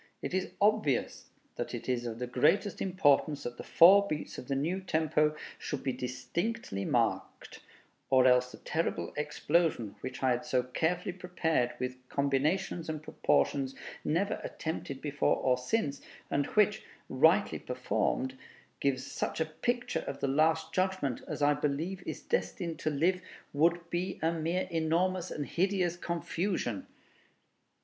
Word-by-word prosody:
It - - -3
is 190 0 0
obvious 205 - +1 0.3
that - - -3
it - - -7
is 120 -2 0
of 115 -1 -5
the 125 - -3
greatest 155 +11 +2
importance 155 -5 +2
that 120 0 -5
the - - -7
four 200 +4 +7
beats 155 -3 -4
of - - -10
the 140 - 0
new 165 +8 0
tempo 155 -3 +1 0.2
should 145 - -4
be 130 - 0
distinctly 125 - -3
marked, - - -1 0.5
or 130 -1 +5
else 125 0 +4
the - - -10
terrible 160 - -2
explosion, 150 - 0
which 130 - -6
I 130 - +4
had 125 +2 0
so 130 -5 +1
carefully 160 +9 -1
prepared 165 -8 0
with 125 0 -3
combinations 155 +6 0
and 155 -1 -4
proportions 135 -3 +1 0.3
never 180 +7 0
attempted 150 -4 -5
before 150 -1 +1
or 130 -1 +2
since, 140 - -1 0.3
and 140 0 +1
which, 210 -1 +2 0.2
rightly 160 +10 +3
performed, 130 +1 -1 0.4
gives 130 -2 0
such - - -3
a 160 - +2
picture 240 +10 -2
of - - -4
the - - 0
Last 160 +3 +2
Judgment 185 -9 0
as - - -3
I 145 0 +5
believe 150 +6 -2
is - - -5
destined 175 - -2
to - - 0
live, 170 +5 +1 0.3
would 170 +3 +2
be 180 +2 -2
a 165 - +3
mere 170 +3 -1
enormous 170 +3 +1
and 145 - -3
hideous 185 0 +1
confusion. 170 - -2
155 Hz, 150 wpm, -31 LUFS, 135-180 Hz, 0.5 s, four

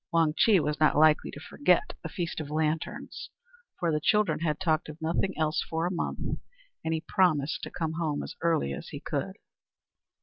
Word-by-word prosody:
Wang 165 -2 +3
Chih 210 0 +5
was 150 0 -1
not 155 -2 +4
likely 155 0 +5
to - - -8
forget - - +1
the - - -5
Feast 175 -4 -3
of 150 -2 -5
Lanterns, 155 +1 -2 0.5
for 170 -2 0
the 150 - +1
children 205 -3 +3
had 155 -2 -1
talked 160 -4 +1
of 155 +1 -9
nothing 165 +4 -1
else 155 -1 +1
for 165 +1 -1
a 180 - 0
month, 170 - -2 0.4
and 160 - -1
he 160 -1 0
promised 160 -7 +2
to - - -5
come 160 -2 -3
home 155 -3 -1
as - - -7
early 165 - +1
as - - -7
he - - -7
could. - - -3
160 Hz, 195 wpm, -28 LUFS, 155-170 Hz, 0.5 s, Chih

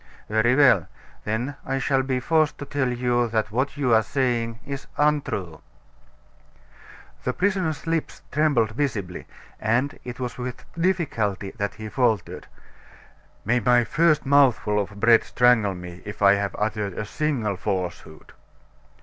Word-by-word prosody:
"Very 110 +3 +3
well; 125 - +5 0.4
then 120 +6 -2
I 135 +1 -2
shall 135 0 +1
be 130 -1 -1
forced 155 +3 +1
to 145 - -7
tell 140 -2 -1
you 120 -1 +1
that 110 -1 -1
what 130 +6 -1
you 130 -5 +2
are 110 - +6
saying 115 -1 -1
is 140 -1 -6
untrue." 135 - 0 1.6
The 125 - -1
prisoner's 180 -6 -1
lips 165 -1 -2
trembled 140 -8 +2
visibly, 110 -9 -3 0.3
and 120 +6 0
it 125 0 -7
was 125 -1 -5
with 125 0 -6
difficulty 140 - -1
that 100 -3 -4
he 110 0 -7
faltered: 110 -5 -1 1.0
"May 120 +4 +2
my 120 +2 +4
first 155 +3 +2
mouthful 135 -7 +3
of 100 0 -4
bread 115 +1 +5
strangle 120 -5 +3
me, 90 0 -9
if 105 0 -6
I 100 0 +7
have 100 0 -2
uttered 105 -2 -2
a 105 - -3
single 120 -5 -1
falsehood!" 90 -5 -5
120 Hz, 140 wpm, -24 LUFS, 105-140 Hz, 1.6 s, I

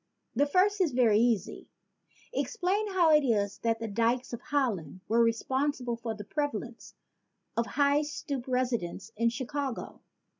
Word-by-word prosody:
The 285 +4 +3
first 385 +6 +3
is 325 -8 +2
very 230 -4 +4
easy: 225 -5 0 0.6
Explain 420 -3 0
how 345 -4 +5
it 300 -1 +6
is 205 -6 0
that 230 -1 +1
the 225 - -3
dykes 230 +4 0
of 235 - -5
Holland 215 - -1
were 230 +2 +3
responsible 250 +2 0
for 230 -1 -4
the 210 - -7
prevalence 240 -1 -4 0.6
of 235 0 0
high 285 0 +3
stoop 280 -3 -4
residences 235 -6 -1
in 230 +2 +2
Chicago. 265 +2 -4
245 Hz, 145 wpm, -29 LUFS, 225-290 Hz, 0.6 s, it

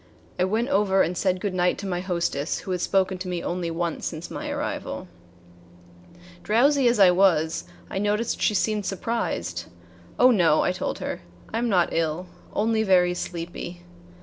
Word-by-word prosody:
I 180 - +4
went 225 +6 0
over 200 -7 +3
and 175 +3 -2
said 185 +1 +1
good 200 -1 -2
night 180 0 +1
to 200 - -6
my 180 -2 -2
hostess 170 -5 -2
who 190 - -6
had 180 -1 -1
spoken 190 -1 +1
to 185 - -5
me 175 -1 -3
only 175 -1 -2
once 170 0 -2
since 160 0 -6
my - - -5
arrival. - - -4 1.3
Drowsy 260 +6 +3
as 240 -1 +3
I 190 -3 +7
was, 160 - +2 0.2
I - - -3
noticed 210 +3 0
she 210 - +2
seemed 210 0 0
surprised. 135 - -2 0.5
"Oh, 255 +1 +6
no," 170 -8 +4
I - - +2
told 180 - -3
her; - - -4 0.3
"I 225 - 0
am 240 0 0
not 180 -4 +3
ill, 165 +2 -1 0.3
only 220 +1 +1
very 180 -4 +4
sleepy." 175 0 -6
185 Hz, 175 wpm, -25 LUFS, 175-210 Hz, 1.3 s, I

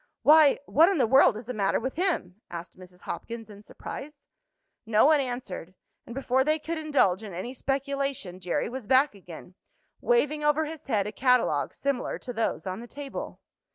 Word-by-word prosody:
"Why! 305 -1 +7
what 325 +6 +5
in 390 - +1
the 265 - +3
world 245 -2 +5
is 225 - -8
the 250 - -5
matter 200 -3 +1
with 260 +3 -3
him?" 295 - -2
asked 170 0 -8
Mrs. 180 -1 -15
Hopkins 225 +5 -7
in 205 0 -12
surprise. 285 +6 -9 0.6
No 220 0 +3
one 305 0 +5
answered, 245 -9 -5 0.3
and 235 - -8
before 265 -1 +1
they 305 +2 +2
could 320 +1 -4
indulge 280 -12 +2
in 205 -5 -8
any 215 +8 -5
speculation 275 -8 -3
Jerry 180 -1 -1
was 250 -2 -7
back 265 +2 +4
again, 180 -2 -12 0.5
waving 305 - +1
over 295 +1 +2
his 315 0 -8
head 210 -6 +1
a 210 - -4
catalogue 250 +2 +1
similar 275 -3 -2
to 250 - -7
those 225 -2 -2
on 185 +1 -4
the 240 - -9
table. 280 +2 -7
255 Hz, 185 wpm, -27 LUFS, 205-290 Hz, 0.6 s, Why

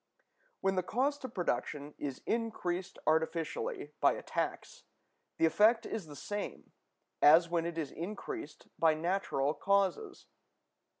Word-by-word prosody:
When 195 -1 +1
the - - +4
cost 270 +10 0
of 250 - -8
production 145 -3 -2
is 140 -3 -5
increased 190 -6 -2
artificially 160 -1 0
by - - +5
a - - -7
tax, - - -3 0.5
the - - +4
effect 215 +8 +4
is 210 -7 -4
the 145 - -10
same 205 +6 -5 0.5
as 165 +3 +7
when 170 -1 0
it 170 -1 -5
is 155 -4 -2
increased 215 - -6
by 160 -1 +5
natural 155 -4 0
causes. 200 - 0
175 Hz, 130 wpm, -33 LUFS, 160-210 Hz, 0.5 s, as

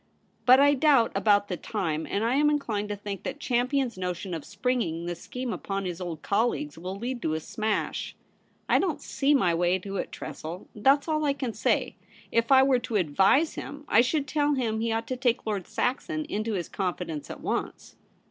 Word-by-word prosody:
' - - -40
But 255 +1 +8
I 285 +1 +6
doubt 275 -4 +4
about 205 -1 +3
the 180 - -3
time; 160 -8 -2
and 200 - 0
I 235 - +2
am 295 +2 +4
inclined 220 -9 -1
to 205 - -2
think 200 -1 -6
that 295 - -5
Champion's 250 -3 0
notion 180 0 -3
of 160 -3 -4
springing 205 -7 -1
this 175 -1 -5
scheme 250 -2 -4
upon 195 -1 -3
his 180 0 -4
old 165 -4 -5
colleagues 240 +8 0
will 180 +3 -6
lead 240 +3 -4
to 155 -6 0
a - - -1
smash. 215 +4 -2 0.5
I - - +4
don't 365 -5 0
see 290 +1 +1
my 180 -10 +3
way 175 +2 +2
to 195 +1 -6
it, - - -3
Tressel; 165 +4 -7
that's 275 +8 +3
all 310 -1 0
I 285 -2 +2
can 260 -5 -4
say. 215 - 0 0.3
If 230 +3 +1
I 265 0 +8
were 265 -2 +3
to 240 -2 -5
advise 195 - +3
him, 290 0 -7
I 225 - +6
should 280 +4 0
tell 290 +1 +1
him 225 -4 -1
he 230 0 0
ought 225 0 -1
to 255 - -3
take 245 -2 +1
Lord 205 -5 -2
Saxon 310 +5 -1
into 220 -5 -2
his 180 -4 -2
confidence 180 -5 -3
at - - -8
once.' - - -4
225 Hz, 205 wpm, -27 LUFS, 190-265 Hz, 0.5 s, But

